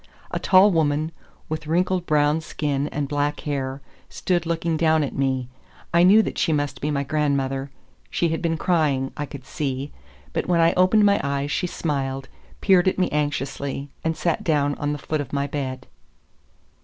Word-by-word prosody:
A - - -1
tall 195 +2 +6
woman, 155 -1 +1 0.4
with 155 0 -4
wrinkled 180 +2 +1
brown 150 0 +3
skin 145 -2 -2
and 145 -2 -3
black 145 +1 -1
hair, 135 -2 -3 0.3
stood 175 -2 -1
looking 165 0 0
down 160 -1 +3
at 140 - -3
me; 130 -2 0 0.5
I 170 - +5
knew 200 +5 +7
that - - -4
she 165 - +2
must 145 -3 -1
be 150 - -1
my 140 -2 0
grandmother. 140 -2 -1 0.4
She 170 - 0
had 160 - -2
been 165 -2 0
crying, 150 -7 +1
I 145 -1 -4
could 135 -1 -10
see, 135 +1 -3 0.4
but - - -1
when 175 -1 +2
I 165 0 +4
opened 185 +4 +4
my 200 0 +4
eyes 140 0 -1
she 180 - 0
smiled, 135 -5 -3 0.3
peered 190 -2 +4
at 185 - +2
me 185 - +2
anxiously, 140 -1 -2
and 160 0 -1
sat 170 -2 0
down 145 -3 +2
on 145 0 -1
the 150 - -2
foot 150 +2 -2
of 140 - -8
my 140 0 0
bed. 130 -2 -4
150 Hz, 180 wpm, -23 LUFS, 140-165 Hz, 0.5 s, knew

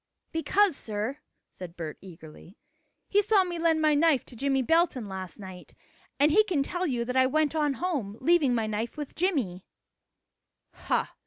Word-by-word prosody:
"Because, 370 +2 +2
sir," 220 +6 -4 0.3
said 175 -2 -10
Bert 160 -3 -6
eagerly, 170 0 -13 0.5
"he 410 - +3
saw 415 -1 +3
me 350 -2 -5
lend 325 -1 +2
my 305 -1 +4
knife 295 -3 +3
to - - -13
Jimmie 270 +2 0
Belton 325 -6 +1
last 190 -3 -7
night, 185 -2 -11 0.4
and 295 +2 +5
he 430 +6 +6
can 350 -10 0
tell 355 +5 -2
you 240 -4 -1
that 250 +1 -4
I 260 0 +5
went 310 +2 +1
on 300 -3 +1
home, 270 - -3
leaving 295 -4 +3
my 225 -2 0
knife 220 +5 -4
with 295 -2 -6
Jimmie." 270 - -1 1.1
"Ha! - - -2
275 Hz, 170 wpm, -27 LUFS, 215-330 Hz, 1.1 s, he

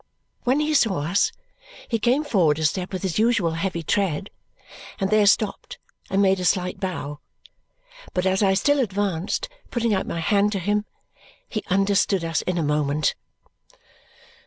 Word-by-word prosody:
When 255 +4 +3
he 305 +1 0
saw 215 - +2
us, 175 +6 +2 0.6
he 230 - -1
came 250 +7 +2
forward 180 - +2
a 160 - -1
step 180 +4 -1
with 185 0 -4
his 190 0 -1
usual 220 -7 +2
heavy 170 0 -3
tread, 195 +1 -1 0.7
and 195 0 -1
there 215 -1 +4
stopped 210 0 +1 0.3
and 195 +1 +2
made 190 -1 +3
a - - -3
slight 180 +1 0
bow. 150 -6 -4 1.0
But 180 0 0
as 190 +1 +2
I 195 -1 +3
still 285 +9 +2
advanced, 200 -6 -1 0.2
putting 235 -2 0
out 190 - -1
my 170 - -3
hand 205 +4 +2
to 195 - -1
him, 205 +3 0 0.6
he 215 - -3
understood 195 -1 +2
us 165 -1 0
in 180 -1 -2
a 165 - 0
moment. 150 0 +1
195 Hz, 160 wpm, -23 LUFS, 170-210 Hz, 1.0 s, there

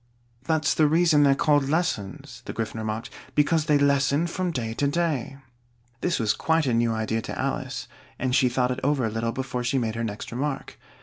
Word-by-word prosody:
"That's 155 -1 +2
the 155 - +4
reason 160 -1 +4
they're 140 -1 +5
called 145 -1 +2
lessons," 140 - -2
the - - -5
Gryphon 110 0 -4
remarked: 110 +1 -4 0.2
"because 150 +1 +3
they 150 -2 +4
lessen 140 +2 +2
from 180 +1 -2
day 115 -8 -3
to 140 +5 0
day." 145 -4 -1 0.6
This 175 +4 0
was 110 -4 +2
quite 160 -1 +1
a 125 - +1
new 115 0 +2
idea 110 0 -1
to - - -6
Alice, - - -3 0.3
and 130 -1 -1
she 130 - +4
thought 125 0 +1
it 125 - -2
over 140 -3 +2
a 110 - -1
little 115 +1 -1
before 130 -1 -3
she 125 +3 0
made 115 -3 0
her 115 +1 -3
next 105 -2 -5
remark. 135 +3 -4
135 Hz, 200 wpm, -25 LUFS, 115-150 Hz, 0.6 s, they're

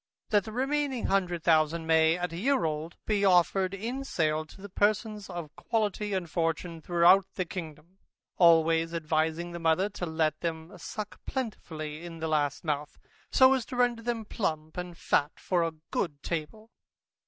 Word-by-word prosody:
That 205 -2 +3
the 220 - -6
remaining 270 +1 -1
hundred 180 -4 0
thousand 160 0 +3
may, 160 +1 +4
at 180 -1 -3
a - - -5
year 255 -1 +2
old, 155 +2 -3
be 210 -2 +1
offered 185 +1 +3
in 240 +7 -4
sale 155 - 0
to - - -15
the 200 - -8
persons 210 +1 0
of 170 -4 -7
quality 210 -2 -1
and 185 -3 -1
fortune, 165 0 -2
through 175 +4 +5
the 185 - -1
kingdom, 170 +1 -8 0.4
always 165 -1 +4
advising 160 +1 0
the 170 - -6
mother 165 +4 +2
to 185 -3 -5
let 160 -1 0
them 165 +2 -4
suck 210 +4 -7
plentifully 160 - -5
in 170 -1 -8
the 160 0 -3
last 145 -2 0
month, 150 -2 -3 0.3
so 260 0 +7
as 260 -3 0
to 255 - -6
render 245 -2 +2
them 230 -1 -2
plump, 155 -7 -3
and 180 -1 -6
fat 145 -2 +1
for 180 -2 0
a 165 0 0 0.2
good 145 -5 -2
table. 195 +8 -5
175 Hz, 170 wpm, -29 LUFS, 160-205 Hz, 0.4 s, so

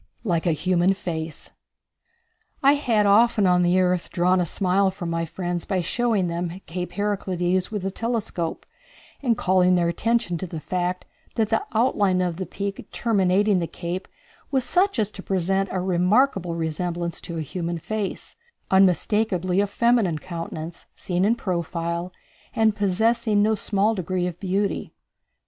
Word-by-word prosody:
Like 175 -5 0
a - - +4
Human 180 +3 +2
Face. 165 -5 -6 1.1
I 275 +1 +7
had 235 -8 +2
often 215 +1 +4
on 180 -1 +4
the 175 +1 +3
earth 180 -1 +1
drawn 180 +1 +2
a 175 - -1
smile 190 +3 +2
from 175 -3 -5
my 165 0 -1
friends 175 0 -3
by 190 -3 -1
showing 225 0 0
them 170 +1 -3
Cape 180 +1 -5
Heraclides 185 -3 -1
with 205 -3 -4
a 195 - -1
telescope, 215 -7 -3 0.6
and 240 -5 +1
calling 185 0 +3
their 170 -1 +2
attention 225 -2 0
to 185 - -4
the 165 -2 -6
fact 180 +2 -2 0.3
that 220 -3 +1
the 225 - +1
outline 205 -5 +2
of 175 -2 -1
the 185 - -4
peak 200 0 -5
terminating 200 -2 +2
the 170 - -2
cape 175 +3 -5 0.4
was 265 -2 +1
such 385 +4 +2
as 215 -2 0
to 195 - -9
present 195 +1 0
a 185 - -1
remarkable 185 +1 +2
resemblance 170 +1 -3
to 170 - -6
a - - -2
human 170 +2 -3
face, 210 +3 -4 0.4
unmistakably 190 0 +2
a 205 - +1
feminine 225 -5 +2
countenance, 165 -1 -7
seen 180 0 -1
in 220 +4 +3
profile, 170 -3 -3 0.4
and 220 -2 +3
possessing 215 +2 +2
no 220 +1 +3
small 210 +1 +1
degree 185 -2 -2
of 175 -1 -4
beauty. 195 +1 -2
185 Hz, 155 wpm, -24 LUFS, 175-210 Hz, 1.1 s, I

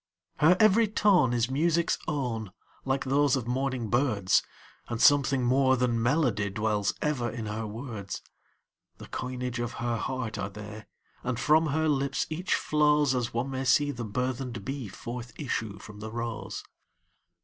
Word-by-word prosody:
Her 160 +6 +5
every 215 +1 +5
tone 195 - +3
is 120 +1 0
music's 170 +4 +1
own, 115 -9 -2 0.3
like 135 0 0
those 140 +1 +3
of 130 -4 -2
morning 130 -1 -1
birds, 115 -7 +3 0.5
And 115 - -4
something 140 -2 +5
more 130 +1 +3
than 120 -2 +1
melody 120 -6 +1
dwells 105 0 0
ever 135 -6 0
in 115 0 -5
her 110 +1 -3
words; 110 -3 -6 0.7
The - - -10
coinage 125 -1 -4
of 120 -1 -3
her 120 0 -2
heart 130 -2 -3
are 95 - -2
they, 105 +1 -9 0.4
and 125 -2 -2
from 155 +4 +4
her 160 +2 +1
lips 140 -2 0
each 175 +4 0
flowsAs 150 -5 +2
one 120 +4 -2
may 130 0 -2
see 145 +2 +3
the 120 -4 -5
burthened 125 0 -3
bee 135 -3 -4
forth 120 +4 -7
issue 115 -7 -3
from 105 +1 -11
the 110 +1 -6
rose. 115 -3 -5
125 Hz, 155 wpm, -28 LUFS, 115-140 Hz, 0.7 s, Her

